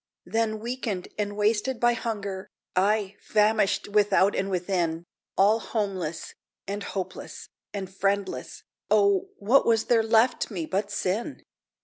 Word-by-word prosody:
Then, 220 +3 0
weakened 230 -5 -4
and 205 0 -2
wasted 220 +4 +1
by 240 0 +4
hunger 200 -5 -4 0.3
Ay, 200 +1 +2
famished 210 -1 +2
without 205 -1 +3
and 195 - -1
within 175 -3 -1 0.3
All 210 +3 +5
homeless, 195 -8 -3 0.3
and 200 +1 -3
hopeless, 185 -2 -6 0.2
and 195 -2 -4
friendless, 195 +1 -2 0.3
O, 395 -1 +3
what 240 +7 +4
was 225 -1 +3
there 230 -2 +4
left 225 +2 +3
me 180 -7 -3
but 195 +4 -1
sin? 205 +8 -2
205 Hz, 125 wpm, -26 LUFS, 190-225 Hz, 0.3 s, All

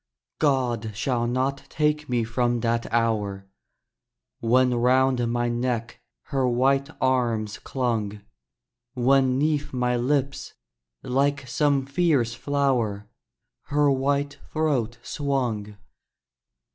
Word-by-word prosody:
God 120 -7 +1
shall 120 -1 0
not 130 +3 0
take 150 -1 0 0.2
from 120 +1 0
me - - -1
that 115 0 -1
hour, 105 -4 0 0.9
When 125 +2 +3
round 125 0 +2
my 120 0 0
neck 120 -1 -2 0.3
her 135 -3 +1
white 135 +3 +2
arms 120 -5 0
clung! 110 -5 -2 0.7
When 130 +1 +3
'neath 150 0 0
my 125 -1 +1
lips, 140 +2 -1 0.5
like 140 +1 0
some 140 +1 +1
fierce 140 -5 +1
flower, 120 -6 -1 0.6
Her 145 0 +2
white 140 +1 0
throat 135 -7 0
swung! 120 -8 -2
125 Hz, 100 wpm, -25 LUFS, 120-140 Hz, 0.9 s, When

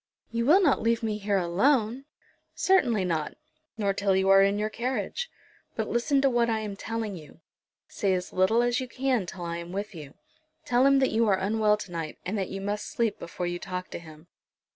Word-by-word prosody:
"You 235 +1 -1
will 375 +7 +6
not 290 -6 +3
leave 230 0 +1
me 215 -1 -1
here 200 -1 0
alone?" 220 +8 +1 0.5
"Certainly 240 - +3
not, 160 -4 -2 0.4
nor 200 -2 +1
till 195 -1 +1
you 190 0 +2
are 195 0 +7
in 200 +1 +3
your 210 +1 0
carriage. 250 - -3 0.5
But - - -2
listen 270 +4 +1
to 275 - +4
what 240 -1 +2
I 225 - +1
am 210 -2 -5
telling 225 0 -4
you. 160 -1 -13 0.5
Say 195 -2 0
as 180 0 -5
little 220 +6 +3
as 240 0 +1
you 255 - -4
can 250 -5 -1
till 180 -1 -7
I 170 0 -3
am 170 0 -7
with 200 +2 -4
you. 150 -4 -10 0.5
Tell 250 +2 +4
him 275 0 +5
that 265 -1 +2
you 225 0 +2
are 195 -2 +3
unwell 210 +2 +2
to 205 -3 -9
night, 165 -3 -5
and 190 +4 -2
that 195 -3 -2
you 195 - -5
must 205 +1 -3
sleep 225 -3 -1
before 175 +1 -5
you 175 0 -3
talk 180 0 -6
to - - -5
him." 155 -1 -14
210 Hz, 215 wpm, -27 LUFS, 185-235 Hz, 0.5 s, are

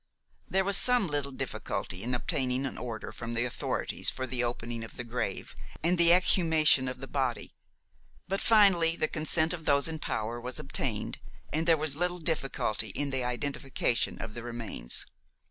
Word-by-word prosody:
There 190 0 +2
was 200 0 +5
some 250 -4 +5
little 145 -3 -2
difficulty 90 -7 -4
in 125 +3 -1
obtaining 130 -1 -1
an 135 - -4
order 115 -3 -6
from 115 0 -5
the 120 +1 +1
authorities 120 - -2
for 130 - -3
the 125 -1 -1
opening 120 -1 -3
of 115 - -10
the 125 - -4
grave 120 -4 -4 0.3
and 175 +2 +2
the 170 0 +7
exhumation 160 -6 +5
of 130 0 -5
the 135 - -6
body; 130 -4 -2 0.7
but 195 +2 -2
finally 190 -7 +5
the 155 - 0
consent 160 +2 +1
of 160 -3 -7
those 140 +1 +3
in 160 -1 -4
power 115 -3 -3
was 125 +1 -6
obtained, 135 -6 -3 0.3
and 160 +2 -1
there 165 -1 +5
was 150 -2 +1
little 180 +2 -1
difficulty 155 -9 -1
in 145 -1 -2
the 130 -1 0
identification 125 -1 -1
of 110 -1 -6
the 120 - -6
remains. 115 - -1
135 Hz, 175 wpm, -29 LUFS, 120-165 Hz, 0.7 s, the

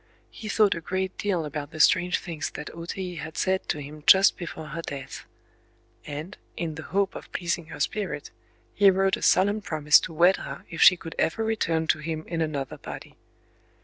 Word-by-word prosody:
He 215 - -8
thought 210 -2 +4
a 170 - -6
great 185 +2 -3
deal 185 -6 0
about 145 -1 -5
the 155 - -10
strange 180 +3 +4
things 160 -3 -5
that 150 - -6
O 165 0 -8
Tei 180 -2 -5
had 160 0 -7
said 190 0 0
to - - 0
him 150 +1 -9
just 195 +1 +7
before 160 -3 -7
her 165 +2 -5
death; 140 -4 -7 0.8
and, 150 +7 -7 0.2
in 165 -2 -3
the 155 - -7
hope 195 0 +1
of - - -10
pleasing 170 -2 -2
her 165 - -9
spirit, 195 -9 -3 0.4
he 200 -1 +6
wrote 190 0 +2
a - - -10
solemn 205 +3 +3
promise 150 -5 +4
to - - -6
wed 175 +4 +4
her - - -8
if 165 - -4
she 180 - +8
could 165 -1 -8
ever 225 +7 +1
return 170 -8 0
to 160 - +2
him 155 0 -4
in 165 -1 -3
another 145 -4 -3
body. - - -9
170 Hz, 200 wpm, -26 LUFS, 155-190 Hz, 0.8 s, she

